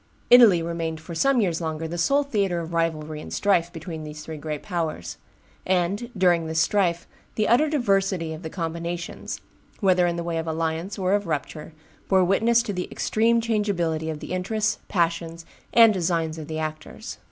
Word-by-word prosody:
Italy 225 -9 +8
remained 165 -1 -3
for 160 +2 -9
some 260 +10 +3
years 175 -4 0
longer 160 0 -3
the 170 +2 -5
sole 280 +11 +3
theatre 200 -10 0
of 170 0 -6
rivalry 155 -2 -1
and - - -9
strife 175 -4 +2
between 160 -1 -7
these 150 0 -8
three 160 -1 -6
great 150 -1 -5
powers; 165 - -3 0.5
and, 190 +6 0
during 175 -3 +3
this 160 0 -1
strife, 175 -1 +1 0.3
the 215 - +1
utter 295 +7 +4
diversity 195 - +1
of 160 - -8
the 160 - -6
combinations, 170 0 -5 0.4
whether 185 -3 +3
in 170 - -1
the 170 - -3
way 170 -1 -2
of 160 - -4
alliance 165 +4 -2
or 190 0 +1
of 205 -2 0
rupture, 150 +1 -4 0.4
bore 190 -1 +5
witness 225 +6 +3
to 215 -4 -4
the 180 -1 -3
extreme 230 +2 +2
changeability 185 -8 -1
of 155 -2 -5
the - - -7
interests, 215 +4 -1
passions, 165 -2 -1 0.3
and 230 -2 +7
designs 165 -3 -1
of 155 - -7
the 155 - -4
actors. 155 0 -6
170 Hz, 180 wpm, -24 LUFS, 160-200 Hz, 0.5 s, Italy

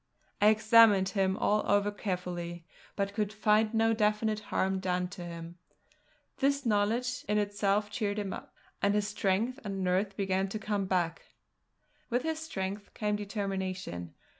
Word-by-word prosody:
I 205 - +6
examined 215 -2 +6
him 195 -1 +1
all 210 0 +2
over 205 0 +3
carefully, 175 -4 -4 0.3
but 200 0 -1
could 210 0 -1
find 215 0 +2
no 225 0 +3
definite 215 0 +1
harm 190 0 +1
done 180 -1 -1
to 180 -1 -8
him. 170 0 -8 0.8
This 280 0 +1
knowledge 230 +4 +1
in 210 - +2
itself 205 0 +1
cheered 205 -1 -1
him 200 -2 -2
up, - - -8 0.3
and 200 +1 +3
his 210 -1 +1
strength 210 +5 0
and 195 -2 -3
nerve 190 +2 0
began 190 -1 0
to 215 - -3
come 205 -2 -2
back; 175 -3 0 0.9
with 245 +1 0
his 320 -1 -2
strength 200 -9 -5
came 210 -1 0
determination. 190 - -4
205 Hz, 150 wpm, -30 LUFS, 190-215 Hz, 0.9 s, I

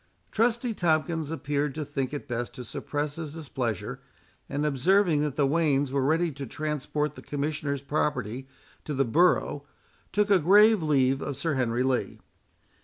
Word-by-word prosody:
Trusty 235 +1 +1
Tomkins 160 -3 0
appeared 145 -3 -2
to 155 -1 -3
think 135 -2 -3
it 145 - -6
best 120 -1 -4
to 125 - -7
suppress 145 +5 -4
his 155 -2 -6
displeasure; 130 - -4 0.5
and 145 +2 -1
observing 155 +3 +3
that 150 -3 -1
the 145 - +2
wains 145 -2 +2
were 140 0 +1
ready 160 +5 +2
to 140 -1 -7
transport 150 +1 -2
the - - -11
Commissioners' 145 -1 -3
property 130 -4 -2 0.4
to 150 - -4
the 135 +1 +2
borough, 150 +1 +2 0.5
took 205 0 +1
a 195 - +6
grave 205 +5 +6
leave 135 -3 +2
of 140 -3 -4
Sir 160 +3 -1
Henry 125 -2 0
Lee. 130 -1 -1
145 Hz, 160 wpm, -27 LUFS, 135-160 Hz, 0.5 s, a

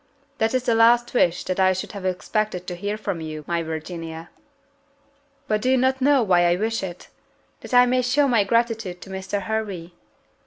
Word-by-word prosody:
"That 225 +3 +1
is 255 - +1
the 245 -3 +1
last 235 +1 +4
wish 175 -8 +2
that 185 +1 -3
I 185 0 +4
should 185 - -5
have 200 -3 -7
expected 185 0 -2
to 180 - -5
hear 205 +4 -3
from 200 -6 -4
you, 155 -1 -6
my 170 -1 -1
Virginia." 160 +1 -6 1.2
"But 215 0 0
do 255 - 0
you 260 - +4
not 260 +1 +1
know 275 -1 +4
why 175 -4 +3
I 175 - +3
wish 225 +4 -1
it? 180 -2 -7 0.5
that - - -4
I 245 0 +8
may 255 +1 +2
show 275 +4 +2
my 235 -5 +3
gratitude 225 -4 0
to 195 - -10
Mr. 190 +1 -4
Hervey." 200 -6 -4
205 Hz, 195 wpm, -23 LUFS, 175-235 Hz, 1.2 s, I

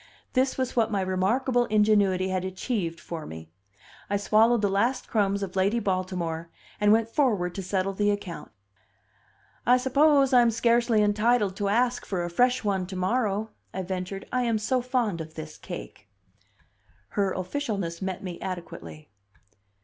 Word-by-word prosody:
This 260 +1 +1
was 260 -1 -2
what 230 -3 +2
my 205 -3 0
remarkable 235 +7 +1
ingenuity 205 -4 +3
had 185 -1 -1
achieved 185 -2 -3
for 165 -2 -7
me. 80 0 -10 0.6
I 205 - +1
swallowed 220 +2 +3
the - - +4
last 235 +7 0
crumbs 200 -2 +1
of 190 -1 -6
Lady 195 +4 +2
Baltimore, 180 -5 -2 0.3
and 210 0 +4
went 225 +1 +4
forward 220 - +1
to 195 - -4
settle 190 +1 -1
the 205 +1 +1
account. 205 -4 -4 1.1
"I 250 +1 +5
suppose 275 +1 +3
I'm 240 -2 +6
scarcely 230 -1 +3
entitled 210 -1 +2
to 200 -1 0
ask 245 +3 +1
for 185 -3 -2
a 175 - -4
fresh 250 +7 +2
one 190 -3 0
to 190 - -7
morrow," 210 +2 0 0.2
I 190 - -2
ventured. 185 +1 -4
"I 255 - +1
am 230 -2 +1
so 250 +4 0
fond 240 -8 -1
of 160 0 -9
this 155 -1 -7
cake." - - -9 1.0
Her 200 -2 0
officialness 190 -5 -3
met 190 -1 -4
me 180 -2 -6
adequately. 125 - -7
205 Hz, 155 wpm, -26 LUFS, 185-235 Hz, 1.1 s, I'm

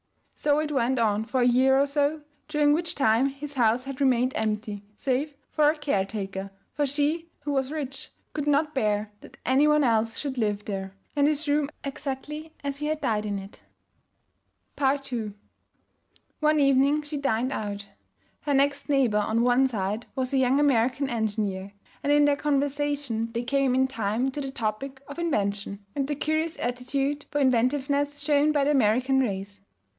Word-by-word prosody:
So 290 -1 +1
it 305 0 -1
went 260 -1 +1
on 220 -2 +1
for 255 +2 0
a 245 - +4
year 260 +2 +4
or 280 - +4
so, 290 +2 0 0.3
during 295 -1 +3
which 335 +2 -1
time 250 -1 +3
his 280 +1 -7
house 240 -1 +2
had 275 +1 -7
remained 255 -1 +3
empty, 210 -1 -2
save 280 +5 -1 0.2
for 300 -1 +4
a 310 - 0
caretaker, 195 -7 -2 0.2
for 290 -1 0
she 300 +4 -1
(who 290 0 -3
was 270 -1 0
rich) 280 -4 -5 0.2
could 295 -1 -3
not 295 +1 +2
bear 210 -4 0
that - - -14
any 270 +4 +4
one 300 0 +4
else 225 -2 +1
should 270 -3 -3
live 210 -2 -1
there, 195 -1 -5 0.2
and 285 0 +4
his 305 0 0
room 290 0 +2
exactly 295 +3 -5
as 280 0 -3
he 300 - -2
had 310 0 -1
died 215 -1 0
in 200 -1 -2
it. 195 +1 -10 1.2
II 265 -6 0 1.1
One 305 0 +3
evening 275 +2 +4
she 295 0 -5
dined 255 -2 0
out. 205 -4 -4 0.5
Her 290 -2 0
next 280 +2 +1
neighbor 255 -7 +3
on 220 +3 +1
one 250 +2 +4
side 210 -1 -3
was 260 0 -2
a - - +3
young 260 +2 +3
American 270 -1 +2
engineer, 205 -4 -2 0.3
and 285 - 0
in 290 0 +5
their 290 -1 +4
conversation 285 -5 -1
they 235 +1 -2
came 270 0 +1
in 260 0 +4
time 235 0 -1
to 290 - -4
the 270 - -4
topic 265 +3 -4
of 285 +4 -8
invention 200 -10 -2
and 275 -2 -1
the 295 - -1
curious 315 +3 -1
aptitude 270 +4 -2
for 290 - -3
inventiveness 280 +3 +1
shown 295 0 +3
by 290 -2 +2
the 290 - +2
American 260 +1 +3
race. 200 -4 -3
270 Hz, 175 wpm, -26 LUFS, 225-290 Hz, 1.2 s, in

